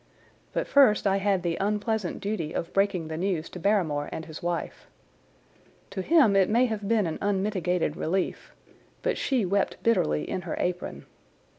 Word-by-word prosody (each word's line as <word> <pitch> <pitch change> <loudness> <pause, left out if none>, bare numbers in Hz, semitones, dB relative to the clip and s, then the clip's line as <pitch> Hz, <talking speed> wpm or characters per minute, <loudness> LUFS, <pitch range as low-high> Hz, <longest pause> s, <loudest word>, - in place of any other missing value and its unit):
But - - -2
first 265 -8 +5
I 195 0 +3
had 195 -2 +1
the 170 -1 -1
unpleasant 210 -1 -1
duty 195 -6 -3
of 170 - -4
breaking 195 -4 +1
the 160 0 -5
news 175 -3 -1
to 180 - -7
Barrymore 165 -7 +1
and 160 - -5
his 160 -1 -9
wife. 175 -1 -4 1.0
To 190 - -3
him 275 - +4
it 195 -2 +4
may 235 +4 +4
have 215 -4 -3
been 220 -2 +2
an 160 - -3
unmitigated 190 -5 0
relief, 185 +3 -2 0.5
but - - +1
she 255 -7 0
wept 195 +2 0
bitterly 75 - +2
in 185 - -3
her - - -4
apron. 180 0 -3
195 Hz, 165 wpm, -27 LUFS, 170-210 Hz, 1.0 s, first